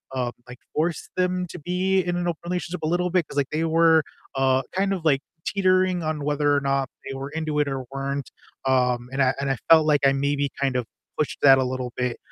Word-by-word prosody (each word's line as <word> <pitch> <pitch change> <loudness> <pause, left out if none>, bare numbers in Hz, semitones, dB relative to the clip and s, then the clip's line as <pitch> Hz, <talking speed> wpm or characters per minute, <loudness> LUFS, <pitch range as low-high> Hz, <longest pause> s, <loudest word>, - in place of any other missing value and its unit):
um, 125 -2 -1 0.2
like, 125 0 -11 0.2
forced 160 +2 -1
them 180 0 0
to - - -8
be 185 +3 +1
in 175 0 -2
an 175 - -1
open 170 -2 -2
relationship 180 -1 -3
a 155 - +1
little 180 +2 +1
bit 180 -3 +1
'cause, 145 - -9
like, 140 -2 +1
they 155 +2 0
were, 160 -1 +4 0.3
uh, 130 0 +3
kind 195 +1 +1
of, 180 -4 -4
like, 140 -3 +3 0.3
teetering 185 -3 +2
on 155 -2 -2
whether 145 0 +2
or 145 - +1
not 135 -1 0 0.2
they 135 - -5
were 135 +1 -5
into 155 -1 -3
it 145 - +2
or 135 -1 -3
weren't, 140 0 -3 0.4
um, 125 -2 +1
and 135 0 +2
I 130 - +3
and 140 0 -1
I 135 - -1
felt 160 -1 +7
like 145 -2 +3
I 135 - +5
maybe, 140 0 0
kind 135 -2 +1
of 125 -2 0 0.3
pushed 150 - -1
that 135 -1 +8
a 130 - +2
little 125 -1 -3
bit, 125 -1 -1
145 Hz, 235 wpm, -24 LUFS, 135-175 Hz, 0.4 s, that